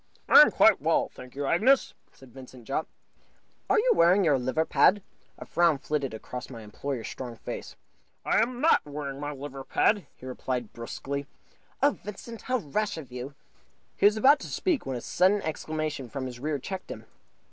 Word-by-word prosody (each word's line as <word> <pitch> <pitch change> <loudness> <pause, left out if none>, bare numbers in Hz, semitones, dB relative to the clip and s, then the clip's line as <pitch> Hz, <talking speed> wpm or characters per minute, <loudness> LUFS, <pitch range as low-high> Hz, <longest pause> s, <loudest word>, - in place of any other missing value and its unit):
"I - - +9
am - - +7
quite - - +4
well, - - +1
thank 125 0 -12
you, 140 0 -3
Agnes," 240 - +3 0.2
said 130 -3 -18
Vincent 130 -2 -12
Jopp. 135 +6 -2 0.8
"Are - - +4
you 485 +3 +3
wearing 190 - +4
your 145 -4 +3
liver 130 +6 0
pad?" 200 +4 +4 0.3
A - - -9
frown 170 -3 +2
flitted 140 -1 -2
across 125 +3 -7
my 115 -4 -9
employer's 115 +3 -5
strong 125 -3 -7
face. - - -7 0.5
"I - - +3
am 240 +2 -1
not 320 - +4
wearing 145 -2 -6
my 145 0 -4
liver 135 -1 -7
pad," 205 +8 +1
he - - -14
replied, 125 -2 -4
brusquely. 140 +4 -5 0.6
"Oh, 285 - +6
Vincent, 210 +2 -8
how 255 0 0
rash 210 - -2
of 140 -6 -9
you!" 125 +3 -7 0.6
He - - +5
was 210 +1 +2
about 275 +6 +6
to - - -8
speak, 335 - -1
when 130 -2 -2
a - - -7
sudden 190 - +2
exclamation 155 -4 -4
from 135 0 -5
his 125 -2 -7
rear 150 +2 -2
checked 190 +7 -7
him. - - -8
145 Hz, 185 wpm, -27 LUFS, 130-200 Hz, 0.8 s, I